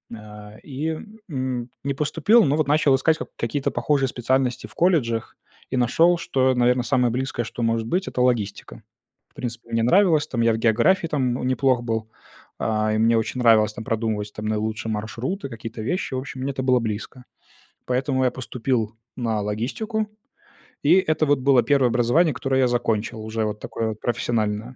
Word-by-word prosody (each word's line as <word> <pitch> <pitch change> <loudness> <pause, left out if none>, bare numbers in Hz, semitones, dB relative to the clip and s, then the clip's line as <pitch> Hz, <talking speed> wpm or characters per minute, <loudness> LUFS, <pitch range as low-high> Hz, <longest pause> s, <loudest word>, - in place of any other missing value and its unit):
А, 105 -1 -12
и, 155 +3 -3 0.3
м, 130 -4 -3
не 140 0 -1
поступил, 165 - +3
но 145 0 +2
вот 155 - +1
начал 145 -2 +4
искать 155 +4 +2
как - - -7
какие-то 135 +4 -1
похожие 140 -3 +1
специальности 125 0 -1
в - - -19
колледжах 135 -11 +1 0.3
и 130 - -2
нашёл, 165 +9 +4
что, 130 -6 +1
наверно, 125 0 +3
самое 125 -1 +2
близкое, 130 0 -2
что 120 - -7
может 115 0 0
быть, 185 +10 -1
это 125 - -2
логистика. 105 - -1 0.5
В - - -40
принципе, 120 -1 -6
мне 115 0 +1
нравилось 170 - +4
там, 120 - -2
я 115 -1 +3
в - - -1
географии 120 - +3
там 130 -5 -1
неплох 130 -1 +2
был, 110 -1 -3 0.5
а, 110 -1 0
и - - +1
мне 115 +1 +3
очень 115 +3 -2
нравилось 110 -2 +5
там 115 0 -7
продумывать 110 -2 -2
там 105 - -6
наилучшие 110 +1 -2
маршруты, 120 - -4
какие-то 115 -1 -7
вещи. 180 - -2
В - - -1
общем, 130 0 -7
мне 135 +2 -1
это 130 -1 -4
было 130 -1 +3
близко. 115 +3 -5 0.6
Поэтому 130 +1 0
я 125 - +2
поступил 120 -3 -2 0.2
на 115 -4 -1
логистику, 135 - -2 0.8
и - - +6
это 155 0 +2
вот 145 -2 +2
было 130 -1 +4
1 140 -3 +3
образование, 125 +8 +3
которое 135 0 0
я 130 - +4
закончил, 115 -2 -1
уже 110 0 -2
вот 105 0 -4
такое 115 -1 -3
вот 110 -1 -7
профессиональное. 110 -3 -1
125 Hz, 180 wpm, -23 LUFS, 110-135 Hz, 0.8 s, и